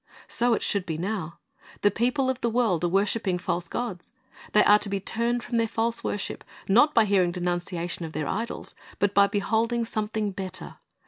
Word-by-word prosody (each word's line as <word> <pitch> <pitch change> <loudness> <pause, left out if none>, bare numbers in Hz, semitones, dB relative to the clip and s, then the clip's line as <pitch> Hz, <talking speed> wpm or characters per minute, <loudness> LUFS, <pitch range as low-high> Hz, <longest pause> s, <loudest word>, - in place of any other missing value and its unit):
"' - - -21
So 240 0 +2
it - - -3
should 200 -2 0
be 160 -2 -2
now. 180 -2 -3 0.4
The 205 - +4
people 250 +5 +1
of 260 -1 -1
the 235 - +1
world 225 -8 +1
are - - +3
worshiping 195 +1 +1
false 175 -1 -2
gods. 200 -4 -5 0.4
They 210 - +6
are 210 +1 +6
to 205 - -2
be 200 0 -1
turned 235 +4 0
from 240 - -2
their 230 0 +2
false 230 +1 -1
worship, 205 - -3 0.2
not 245 +10 +5
by 225 - +6
hearing 190 -4 +3
denunciation 175 -1 -3
of 160 -1 -6
their 155 -1 -2
idols, 230 +3 -3 0.2
but 205 0 +1
by 200 0 +6
beholding 225 +3 0
something 215 -1 -2
better. 185 -1 -6
205 Hz, 195 wpm, -26 LUFS, 180-230 Hz, 0.4 s, They